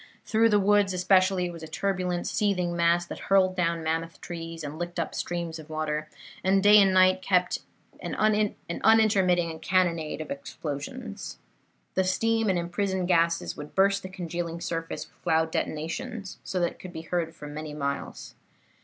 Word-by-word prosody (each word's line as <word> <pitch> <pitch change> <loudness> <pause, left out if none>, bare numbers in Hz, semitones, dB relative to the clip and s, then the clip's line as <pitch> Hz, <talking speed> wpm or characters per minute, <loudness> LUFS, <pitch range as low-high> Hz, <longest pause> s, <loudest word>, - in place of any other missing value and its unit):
Through 225 +1 +3
the 210 -1 +4
woods 200 -1 +3
especially 185 0 +3
it 175 - -4
was 165 - -9
a 160 - -7
turbulent, 180 -1 -1
seething 180 -4 0
mass 170 0 +3
that - - -8
hurled 190 -1 +4
down 170 -2 0
mammoth 165 +1 -2
trees, 165 -1 -7
and 150 +2 -6
licked 175 0 -4
up 165 - -2
streams 170 -2 -3
of 155 0 -12
water, 155 -1 -2 0.3
and 190 +1 +3
day 205 0 +8
and 195 -1 +4
night 185 0 +5
kept 180 -1 +2 0.3
up - - -24
an - - -4
unintermitting 205 -4 +2
cannonade 170 -5 +1
of 155 - -6
explosions. 160 - -6 0.6
The 190 - +2
steam 225 +4 +1
and 185 - +2
imprisoned 185 +1 -1
gases 170 -1 +2
would 150 0 -9
burst 195 +1 +3
the 185 - -7
congealing 170 -2 -4
surface 165 -1 -4
with - - -30
loud 160 0 +2
detonations 165 +8 -4
that 175 -2 -1
could 180 -1 -9
be 160 - -5
heard 165 -1 -2
for 150 - -10
many 150 0 -6
miles. 140 -1 -4
175 Hz, 165 wpm, -27 LUFS, 165-195 Hz, 0.6 s, day